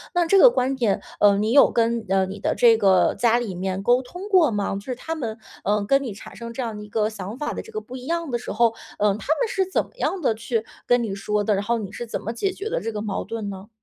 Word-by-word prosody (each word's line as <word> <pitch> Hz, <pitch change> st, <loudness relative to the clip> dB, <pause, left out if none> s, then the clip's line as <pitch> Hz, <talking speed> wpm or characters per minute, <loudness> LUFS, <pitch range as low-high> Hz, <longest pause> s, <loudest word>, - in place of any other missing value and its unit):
那 350 Hz, -1 st, +3 dB
这 390 Hz, +4 st, +4 dB
个 -, -, +9 dB
观 265 Hz, -, 0 dB
点， 230 Hz, -6 st, +1 dB, 0.2 s
呃， 205 Hz, -1 st, +5 dB
你 215 Hz, +2 st, 0 dB
有 280 Hz, +3 st, +7 dB
跟， 230 Hz, 0 st, +1 dB
呃， 190 Hz, 0 st, +3 dB
你 195 Hz, +2 st, -7 dB
的 -, -, 0 dB
这 235 Hz, -2 st, +6 dB
个 195 Hz, -4 st, +4 dB
家 235 Hz, -1 st, +3 dB
里 235 Hz, -5 st, -3 dB
面 190 Hz, +1 st, -3 dB
沟 245 Hz, +4 st, +4 dB
通 360 Hz, +10 st, -9 dB
过 365 Hz, -7 st, +5 dB
吗？ 205 Hz, -3 st, -1 dB
就 195 Hz, -, -4 dB
是 250 Hz, +5 st, -5 dB
他 320 Hz, +6 st, -5 dB
们， 230 Hz, -9 st, -4 dB, 0.3 s
呃， 205 Hz, 0 st, +1 dB
跟 275 Hz, +6 st, +3 dB
你 245 Hz, -, -4 dB
产 200 Hz, -, -11 dB
生 235 Hz, 0 st, -7 dB
这 255 Hz, -, -3 dB
样 225 Hz, -2 st, -4 dB
的 210 Hz, -, -7 dB
一 210 Hz, -, -12 dB
个 210 Hz, 0 st, +1 dB
想 210 Hz, +1 st, -7 dB
法 295 Hz, +2 st, -3 dB
的 -, -, -4 dB
这 450 Hz, -, -14 dB
个 430 Hz, -, -3 dB
不 255 Hz, -, -10 dB
一 255 Hz, 0 st, -8 dB
样 335 Hz, -3 st, -2 dB
的 240 Hz, -, 0 dB
时 -, -, -6 dB
候， 230 Hz, +1 st, +3 dB, 0.2 s
嗯， 205 Hz, -1 st, +2 dB
他 -, -, -10 dB
们 -, -, +1 dB
是 390 Hz, -3 st, 0 dB
怎 -, -, +1 dB
么 -, -, -22 dB
样 390 Hz, -, -1 dB
地 235 Hz, -, +3 dB
去 225 Hz, 0 st, -2 dB, 0.2 s
跟 245 Hz, -1 st, +3 dB
你 215 Hz, -4 st, -3 dB
说 205 Hz, +1 st, -1 dB
的？ 210 Hz, -, +2 dB
然 200 Hz, 0 st, 0 dB
后 235 Hz, +3 st, 0 dB
你 205 Hz, -4 st, -6 dB
是 240 Hz, +2 st, -6 dB
怎 -, -, -3 dB
么 225 Hz, -, -4 dB
解 385 Hz, +12 st, -1 dB
决 405 Hz, +4 st, -5 dB
的 -, -, -1 dB
这 225 Hz, -, -3 dB
个 210 Hz, -, -3 dB
矛 205 Hz, -2 st, -3 dB
盾 225 Hz, -3 st, -4 dB
呢？ 195 Hz, +1 st, -9 dB
230 Hz, 315 characters per minute, -23 LUFS, 205-260 Hz, 0.3 s, 个